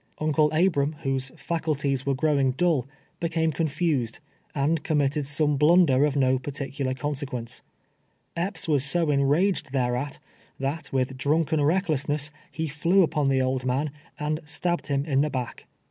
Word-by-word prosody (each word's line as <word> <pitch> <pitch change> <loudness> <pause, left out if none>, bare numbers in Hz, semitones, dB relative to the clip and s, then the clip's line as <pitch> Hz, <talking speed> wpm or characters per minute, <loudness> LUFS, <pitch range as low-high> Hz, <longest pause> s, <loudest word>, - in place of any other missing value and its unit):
Uncle 155 0 +2
Abram, 155 -3 +2
whose 135 -1 -1
faculties 145 -5 -1
were 140 - +2
growing 140 -2 +2
dull, 155 -4 +1 0.3
became 160 -1 0
confused, 150 -6 -1 0.4
and 150 +2 +1
committed 145 -1 0
some 145 0 +2
blunder 150 -3 +5
of 150 -1 -1
no 130 -2 +3
particular 140 -1 -3
conserpience. 130 -3 -4 0.7
Epps 185 +3 -2
was 145 -4 +2
so 160 +2 +1
enraged 145 +5 +2
thereat, 125 +1 -1 0.4
that, 140 +4 -3
with 130 0 -1
drunken 155 +1 +1
recklessness, 150 -3 0 0.2
he 160 0 -3
flew 170 +6 +3
upon 150 -3 0
the 130 -1 +2
old 130 0 -1
man, 135 +4 0 0.3
and 150 +1 -1
stabbed 170 0 -2
him 140 -1 0
in 140 -3 +2
the 150 - +1
back. 125 -4 -5
145 Hz, 145 wpm, -26 LUFS, 135-160 Hz, 0.7 s, blunder